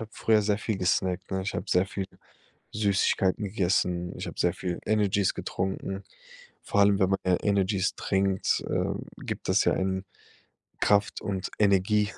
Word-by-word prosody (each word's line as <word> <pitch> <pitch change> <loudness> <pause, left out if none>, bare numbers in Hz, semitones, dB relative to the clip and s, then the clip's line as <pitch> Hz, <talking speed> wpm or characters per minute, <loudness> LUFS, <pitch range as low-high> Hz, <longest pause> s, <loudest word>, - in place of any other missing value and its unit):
habe 110 0 -7
früher 110 -2 +2
sehr 105 0 +1
viel 110 -1 -2
gesnackt, 90 0 0
ne? 95 0 -1
Ich 95 - -4
habe 85 - -3
sehr 90 +2 +3
viel 95 -1 -4 0.7
Süßigkeiten 100 -1 +1
gegessen. 90 -3 0
Ich - - -5
habe - - -8
sehr 90 - +2
viel 90 -2 -4
Energies 100 -3 +2
getrunken. 95 +1 -3 0.6
Vor 100 - +1
allem, 100 0 +5
wenn 95 -1 +3
man 95 - +2
gern 90 -1 +3
Energies 100 -1 +1
trinkt, 95 -1 0
ähm, - - -2
gibt - - -6
das - - +3
ja - - +3
einen 95 0 -1 0.8
Kraft 105 0 +2
und 95 -2 -3
Energie. 105 +1 +3
95 Hz, 165 wpm, -27 LUFS, 95-100 Hz, 0.8 s, allem